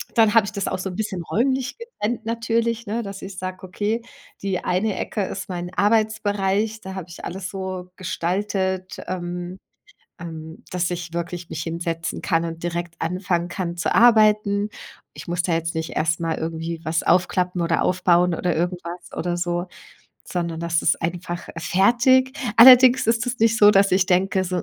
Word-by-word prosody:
dann 220 -2 +5
habe 220 -3 +6
ich 205 - -5
das 200 -2 -2
auch - - -2
so 190 - -3
'n 180 - -7
bisschen 205 -5 -3
räumlich 260 - 0
getrennt 240 - -4
natürlich, 230 0 -1
ne, 230 +3 -2
dass 200 -1 -7
ich 190 -1 -8
sage: 185 0 -5
„Okay, 210 +5 -2 0.4
die 195 -2 -2
eine 190 +3 0
Ecke 205 - -2
ist 195 +1 -5
mein 175 0 -5
Arbeitsbereich.“ 210 0 +1
Da 190 0 -7
habe 190 - -5
ich 170 - -11
alles 190 +2 -5
so 185 -2 -6
gestaltet, 190 +1 -2
ähm, 175 0 -5 0.6
ähm, 160 -1 -8
dass 180 -1 0
ich 170 -1 -5
wirklich 170 0 -4
mich 160 0 -4
hinsetzen 165 0 -3
kann 165 -2 +1
und 165 0 -6
direkt 170 -1 -3
anfangen 180 0 -1
kann 175 -2 -4
zu - - 0
arbeiten. 215 -3 +4 0.5
Ich - - -10
muss 175 0 0
da 175 - -1
jetzt 165 0 -2
nicht 160 0 -3
erst 160 +2 +1
mal 165 -1 -1
irgendwie 165 0 -4
was 160 +1 0
aufklappen 180 0 +1
oder 165 0 +1
aufbauen 180 -1 +3
oder 175 0 -1
irgendwas 175 0 -4
oder 175 0 -1
so, 175 +1 -1 0.6
sondern 170 -2 -3
das 170 -1 0
ist - - +2
einfach 175 +1 -4
fertig. 245 +9 +3 0.2
Allerdings 250 0 +8
ist 230 +2 +1
es 245 - -3
nicht 225 0 +3
so, 205 0 +8
dass 195 -1 +4
ich 190 0 +3
denke 190 0 +2
so, 180 -1 -2
185 Hz, 175 wpm, -22 LUFS, 175-210 Hz, 0.6 s, Allerdings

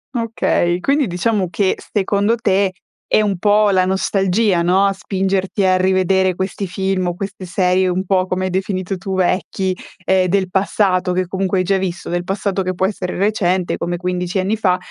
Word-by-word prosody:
Okay, 215 -6 0
quindi 280 +6 +1
diciamo 185 0 -1
che 190 +1 +1 0.2
secondo 205 +2 +1
te, 195 -4 +1 0.4
è - - +5
un 200 -3 0
po' 210 +2 +3
la 185 -2 +3
nostalgia, 190 0 +1
no, 190 +3 +3
a 195 - +2
spingerti 195 0 -1
a 185 -1 +4
rivedere 190 0 +2
questi 190 +1 -3
film 190 0 -1
o 175 - -1
queste 195 0 -6
serie, 185 +1 +1
un 185 +1 -1
po' 185 -1 +2
come 185 0 -2
hai - - -1
definito 190 0 -2
tu, 190 +1 -4
vecchi, 185 0 0 0.3
ehm, 190 -1 +3
del 190 0 +1
passato, 190 -1 +1
che 180 0 0
comunque 190 0 -1
hai - - +2
già 195 +1 +1
visto. 185 -2 -4
Del 175 0 -1
passato 195 +1 -2
che 185 0 -2
può 190 - +1
essere 185 -3 -4
recente, 190 -3 0
come 175 +1 -3
15 180 +1 -2
anni 200 +4 0
fa. 185 -4 +2
190 Hz, 185 wpm, -18 LUFS, 185-195 Hz, 0.4 s, è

